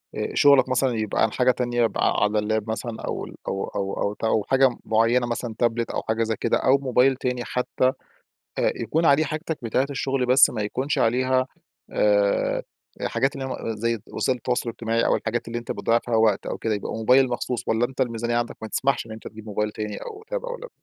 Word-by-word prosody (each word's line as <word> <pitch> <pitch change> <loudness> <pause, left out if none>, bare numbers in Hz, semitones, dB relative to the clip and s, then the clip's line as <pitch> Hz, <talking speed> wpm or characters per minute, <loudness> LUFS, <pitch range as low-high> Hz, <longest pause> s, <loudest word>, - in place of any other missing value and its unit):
آآ - - -2
شُغلك 140 -3 +5
مثلًا 130 0 +2
يبقى 110 0 0
عن 110 - +2
حاجة 125 0 +3
تانية، 120 -1 0
يبقى 115 - +1
ع - - +1
على 105 +1 +2
اللاب 110 +1 -1
مثلًا 110 +1 -4
أو - - -4
ال - - -11
أو 95 - -2
أو 100 -1 -3
أو 100 - 0
ت 105 - -15
أو 110 -2 +2
حاجة 135 -2 +4
مُعيّنة 115 +2 +2
مثلًا 120 -1 -4
تابلت 115 -1 0
أو - - -2
حاجة 110 +1 0
زي 110 0 -1
كده 115 - +2
أو 135 +2 +4
موبايل 130 0 +3
تاني 125 -1 -2
حتى، 125 0 0 0.7
أ - - +2
يكون 160 +9 0
عليه 145 +2 +5
حاجتك 155 +2 -3
بتاعة 130 +4 +1
الشغل 135 -1 -1
بس 130 +2 +6
ما 110 -3 -4
يكونش 130 +7 -2
عليها، 130 +2 +2 0.4
آآ 100 -1 +2 0.4
حاجات 135 +1 0
اللي 135 -1 -4
هي - - -5
م 115 -3 -4
زي 115 +1 -1
وسائل 130 -1 -1
التواصل 120 0 -1
الاجتماعي 115 0 -1
أو - - +3
الحاجات 115 +1 -3
اللي 120 +1 -3
أنت 120 - -6
بتضيّع 115 +1 +1
فيها 120 -2 -2
وقت 110 -3 +3
أو - - -3
كده، 110 -1 -1
يبقى 100 - -5
موبايل 125 +4 +4
مخصوص، 120 0 -3
والّا 115 +2 +2
أنت 130 0 -5
الميزانيّة 120 -1 -1
عندك 120 0 -2
ما 110 - -5
تسمحش 135 +2 0
إن - - -11
أنت 110 - -8
تجيب 110 0 -11
موبايل 105 0 -2
تاني 105 -1 -5
أو 430 0 -8
تاب - - -3
أو - - -5
لاب؟ - - -9
120 Hz, 220 wpm, -24 LUFS, 110-130 Hz, 0.7 s, بس